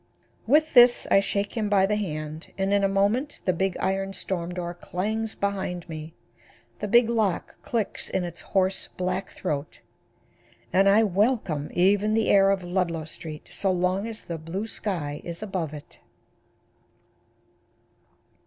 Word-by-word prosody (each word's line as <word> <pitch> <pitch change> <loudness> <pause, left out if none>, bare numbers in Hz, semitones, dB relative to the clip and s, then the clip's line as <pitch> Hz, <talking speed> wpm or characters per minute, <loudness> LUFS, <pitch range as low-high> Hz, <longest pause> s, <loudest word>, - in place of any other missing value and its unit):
With 310 +5 +4
this 245 -1 +7
I - - +7
shake 200 +1 -2
him 215 -3 -1
by 195 -2 +4
the 210 +2 +1
hand 155 -5 -5
and 195 +1 +1
in 200 0 +3
a - - +5
moment 205 +9 +1
the 185 - +3
big 190 +1 -1
iron 195 +1 -1
storm 180 -1 -3
door 175 -1 -4
clangs 215 +6 -3
behind 190 -3 -2
me, 160 0 -8 0.6
the 210 - -3
big 235 +3 +5
lock 220 -6 -1
clicks 230 -4 -2
in 190 - -1
its 175 -1 -6
hoarse, 190 0 0
black 185 +1 -2
throat 150 -4 -4 0.9
and 195 +1 +5
I 210 +3 +6
welcome 195 - +1
even 205 +4 +3
the 225 - +2
air 195 -1 +6
of 195 -2 +1
Ludlow 175 -3 -1
street 155 0 -8
so 195 - 0
long 185 +3 0
as 225 -1 -7
the 170 -2 -5
blue 170 +7 -4
sky 170 -10 -3
is 170 +4 -6
above 185 -7 -3
it. 150 -1 -11
195 Hz, 155 wpm, -26 LUFS, 175-210 Hz, 0.9 s, this